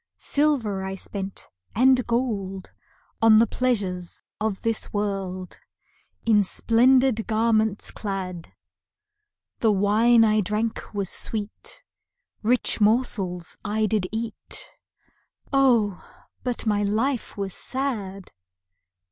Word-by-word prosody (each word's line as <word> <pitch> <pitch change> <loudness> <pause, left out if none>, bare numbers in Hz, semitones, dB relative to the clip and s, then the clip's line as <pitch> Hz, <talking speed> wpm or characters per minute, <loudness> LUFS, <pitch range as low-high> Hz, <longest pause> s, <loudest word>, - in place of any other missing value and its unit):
Silver 255 -10 0
I 190 0 -4
spent 195 0 -5 0.3
and 255 +2 +5
gold, 205 -6 -2 0.5
On 225 -1 +7
the 225 - +6
pleasures 200 -9 -2 0.2
of 215 -3 -2
this 225 -1 -1
world, 195 -3 -3 0.7
In 215 -2 +5
splendid 240 +3 +3
garments 220 -2 +1
clad; 185 -4 -5 1.1
The 225 - +3
wine 220 +4 +4
I 215 0 +3
drank 215 +2 -3
was 200 -3 -1
sweet, 225 - -4 0.6
Rich 235 0 +2
morsels 205 -6 0
I 215 +1 0
did 210 -3 0
eat 225 0 -4 0.8
Oh, 235 -8 +3 0.4
but 245 -2 -3
my 210 -2 +1
life 225 +6 -1
was 195 -2 -3
sad! 210 -8 -3
215 Hz, 100 wpm, -24 LUFS, 195-235 Hz, 1.1 s, On